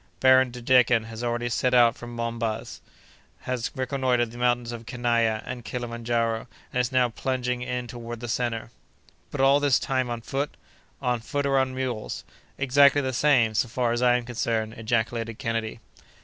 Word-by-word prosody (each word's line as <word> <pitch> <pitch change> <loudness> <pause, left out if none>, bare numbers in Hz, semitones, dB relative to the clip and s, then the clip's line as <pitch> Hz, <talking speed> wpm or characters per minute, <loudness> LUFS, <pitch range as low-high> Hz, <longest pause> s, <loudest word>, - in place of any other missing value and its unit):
Baron 130 0 +6
de 120 0 -9
Decken 125 -2 +4
has 115 +1 -7
already 120 0 -1
set 125 +2 +1
out 120 -1 +6
from 120 0 -9
Monbaz, 115 -1 -3 0.6
has 125 -2 -2
reconnoitred 130 -3 0
the 120 - -11
mountains 120 -1 +1
of 115 -1 -8
Kenaia 115 -3 +1
and 125 -1 -6
Kilimandjaro, 115 -1 -2 0.3
and 125 - +2
is 125 - -2
now 125 -1 +3
plunging 125 +1 -2
in 125 0 -3
toward 120 -1 -7
the 120 - -6
centre." 115 -1 -2 0.6
"But 140 - -3
all 135 +1 +5
this 145 -3 +3
time 130 -2 -1
on 120 -1 -4
foot?" 140 +5 -2 0.5
"On 125 -2 +1
foot 145 +5 -3
or 135 -1 +3
on 130 -1 0
mules." 125 -4 -3 0.3
"Exactly 140 +1 +5
the 130 -1 -2
same, 120 -5 +3
so 110 - +1
far 120 +1 0
as 120 +1 -1
I 125 -1 +5
am 120 - -5
concerned," 115 -2 -2
ejaculated 115 0 -2
Kennedy. 115 -3 -3
120 Hz, 175 wpm, -26 LUFS, 115-130 Hz, 0.6 s, Baron